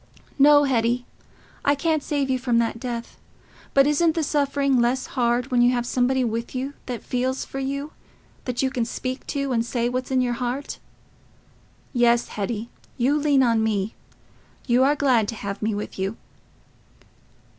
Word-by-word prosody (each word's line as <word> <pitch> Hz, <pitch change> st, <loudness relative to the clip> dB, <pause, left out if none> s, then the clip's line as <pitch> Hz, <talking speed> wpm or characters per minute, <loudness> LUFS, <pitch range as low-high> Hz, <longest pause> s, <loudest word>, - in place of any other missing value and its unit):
"No, 290 Hz, +1 st, +7 dB
Hetty, 245 Hz, -2 st, +1 dB, 0.6 s
I 285 Hz, -, +3 dB
can't 310 Hz, +1 st, 0 dB
save 280 Hz, -2 st, -1 dB
you 255 Hz, -, +1 dB
from 245 Hz, -2 st, +1 dB
that 230 Hz, 0 st, 0 dB
death. 235 Hz, -1 st, -6 dB, 0.6 s
But 275 Hz, 0 st, +6 dB
isn't 315 Hz, +3 st, +2 dB
the 325 Hz, -, 0 dB
suffering 280 Hz, -3 st, +1 dB
less 250 Hz, +2 st, +1 dB
hard 245 Hz, 0 st, 0 dB
when 245 Hz, -1 st, +3 dB
you 245 Hz, +1 st, +5 dB
have 240 Hz, -1 st, -1 dB
somebody 255 Hz, +1 st, +1 dB
with 230 Hz, +1 st, -3 dB
you, 265 Hz, +2 st, -3 dB
that 245 Hz, -3 st, -5 dB
feels 255 Hz, +1 st, -1 dB
for 270 Hz, -, -6 dB
you—that 275 Hz, -2 st, -6 dB
you 265 Hz, -, +1 dB
can 245 Hz, -, -1 dB
speak 255 Hz, +3 st, -5 dB
to, 275 Hz, -1 st, -2 dB
and 230 Hz, -2 st, +1 dB
say 235 Hz, 0 st, -1 dB
what's 255 Hz, +1 st, -3 dB
in 260 Hz, -1 st, +2 dB
your 245 Hz, -1 st, 0 dB
heart?... 250 Hz, +3 st, -3 dB, 1.1 s
Yes, 240 Hz, -1 st, +3 dB
Hetty: 215 Hz, +2 st, -4 dB, 0.3 s
you 260 Hz, +4 st, +2 dB
lean 290 Hz, -2 st, +3 dB
on 230 Hz, -2 st, +2 dB
me: 215 Hz, -1 st, -1 dB, 0.7 s
you 245 Hz, 0 st, +3 dB
are 285 Hz, +2 st, +4 dB
glad 255 Hz, -7 st, +2 dB
to 230 Hz, -, -4 dB
have 200 Hz, -2 st, -5 dB
me 215 Hz, 0 st, 0 dB
with 205 Hz, -1 st, -6 dB
you." 195 Hz, +3 st, -2 dB
250 Hz, 165 wpm, -24 LUFS, 235-275 Hz, 1.1 s, No